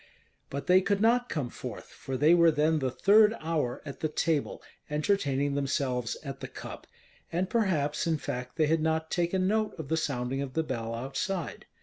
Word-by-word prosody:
But 140 +1 -5
they 185 +1 +6
could 200 +1 +1
not 240 +3 +3
come 140 -6 -2
forth, - - -7
for 135 -1 -6
they 150 +5 +5
were 170 -1 +6
then 155 +1 +2
the 130 -2 0
third 210 - +5
hour 155 -6 -2
at 140 - -7
the 155 - -1
table, 155 -1 -1 0.3
entertaining 145 -3 +1
themselves 130 -4 -1
at 135 -3 -6
the - - -6
cup, - - -9 0.4
and 180 +3 0
perhaps 170 -11 +1
in 160 -1 +2
fact 125 -3 -5
they 155 - +3
had 160 +1 +2
not 160 0 0
taken 180 +2 +1
note 215 +1 0
of 155 -4 -7
the 160 - +1
sounding 135 -3 -1
of 135 -2 -5
the 160 - +1
bell 115 -5 -3
outside. 135 +9 -4
155 Hz, 190 wpm, -29 LUFS, 135-175 Hz, 0.4 s, they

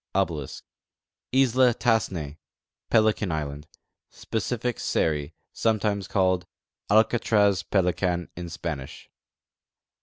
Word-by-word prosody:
t - - +4 1.1
Isla 130 -2 +4
Tas5s'ne 90 - 0 0.5
(Pelican 110 -4 +2
island): 75 -1 -4 0.4
Specific 120 +1 -3
Seri 75 -3 -1 0.2
(sometimes 105 -3 0
called 95 -2 +1 0.4
Alcatraz 105 -3 +3
— - - -45
Pelican 90 -2 +1
in 85 0 -6
Spanish). 75 -6 -6
95 Hz, 85 wpm, -26 LUFS, 85-110 Hz, 1.1 s, t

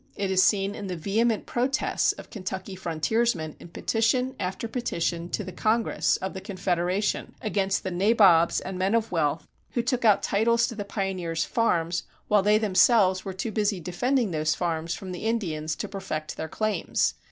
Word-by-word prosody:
It 195 -1 -2
is 185 0 +4
seen 195 0 +2
in 205 - -6
the 180 - -3
vehement 215 +6 0
protests 260 +4 +1
of - - -12
Kentucky 190 -2 -5
frontiersmen 170 0 -1
in - - -11
petition 235 +8 0
after 190 +4 -3
petition 170 -8 -2
to 210 - -2
the 185 - -7
Congress 220 +4 +1
of 190 - -4
the 190 - -6
Confederation 185 0 -1
against 195 -3 0
the 190 - -3
"nabobs" 185 -3 +4
and 185 -1 -6
men 195 +4 +2
of 230 -1 0
wealth 160 -2 0 0.3
who 240 - 0
took 250 0 -1
out 215 -3 +4
titles 230 +3 +2
to - - -6
the 210 - -4
pioneers' 185 -5 -2
farms 175 -6 +1 0.3
while 210 -1 +5
they 210 +2 +4
themselves 195 -2 +4
were 195 - -4
too 200 +5 -4
busy 205 -2 0
defending 220 - 0
those 155 -1 0
farms 165 -1 -2
from 190 -2 -7
the 180 +4 -6
Indians 160 -9 -1
to - - -4
perfect 155 -6 -5
their 160 - -5
claims. 215 +3 0
195 Hz, 175 wpm, -26 LUFS, 175-220 Hz, 0.3 s, while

